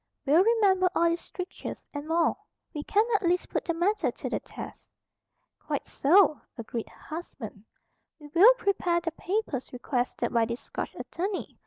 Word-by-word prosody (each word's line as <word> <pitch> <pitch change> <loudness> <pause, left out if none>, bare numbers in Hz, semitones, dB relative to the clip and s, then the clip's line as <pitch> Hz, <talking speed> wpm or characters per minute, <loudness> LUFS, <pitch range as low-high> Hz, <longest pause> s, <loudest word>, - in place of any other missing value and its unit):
"We'll 310 +6 +6
remember 395 -5 +4
all 335 - +4
these 335 +1 -1
strictures, 365 0 -7
and 290 +1 -5
more. 330 +1 +2 0.4
We 300 - -3
can 425 +6 +3
at 415 - +3
least 355 0 +1
put - - -2
the 335 - -1
matter 385 +6 +1
to - - -5
the - - 0
test." - - -10 0.7
"Quite - - -3
so," 310 +1 +4 0.2
agreed 230 0 -5
her - - -19
husband. 225 - -8 0.5
"We 300 - -14
will 420 +9 +8
prepare 365 -6 +1
the 335 -1 -3
papers 350 - -3
requested 250 0 -2
by 230 -1 +4
this 235 +2 -4
Scotch - - -6
attorney. 380 +3 -4
340 Hz, 165 wpm, -28 LUFS, 285-380 Hz, 0.7 s, will